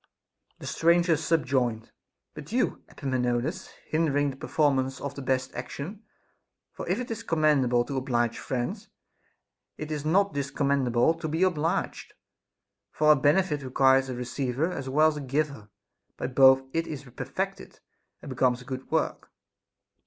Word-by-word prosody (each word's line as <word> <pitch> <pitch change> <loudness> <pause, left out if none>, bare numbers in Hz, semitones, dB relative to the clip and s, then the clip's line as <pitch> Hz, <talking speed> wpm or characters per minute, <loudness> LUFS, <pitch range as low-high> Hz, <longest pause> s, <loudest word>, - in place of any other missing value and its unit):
The - - -10
stranger 170 0 +3
subjoined: 130 -7 0 0.4
But - - -10
you, - - 0
Epaminondas, 130 +6 -2 0.2
hinder 145 -3 +1
the - - -10
performance 135 -2 0
of 140 -1 -5
the 140 - -7
best 130 0 -1
action; 145 - -6 0.7
for - - -7
if - - +1
it 250 -2 -5
is 225 - -4
commend 155 -4 +2
able 120 0 +2
to 140 0 -4
oblige 120 -3 0
friends, 180 - -4 0.9
it 155 0 -6
is 150 -2 -3
not 190 +4 +2
discommendable 140 0 +1
to 155 - -2
be 160 +4 0
obliged; 175 0 -1 0.8
for 155 0 +4
a - - +7
benefit 150 +2 +2
requires 135 0 +3
a 130 - -3
receiver 125 +5 -2
as 135 -6 -5
well 155 +4 +4
as 150 - -5
a - - -4
giver; 140 -5 -2 0.5
by - - -4
both 130 0 +6
it 165 0 -1
is 150 -2 -6
perfected, 125 -4 -5 0.4
and - - -8
becomes 125 -1 +2
a 125 - -13
good 130 0 -6
work. - - -1
140 Hz, 150 wpm, -27 LUFS, 130-155 Hz, 0.9 s, a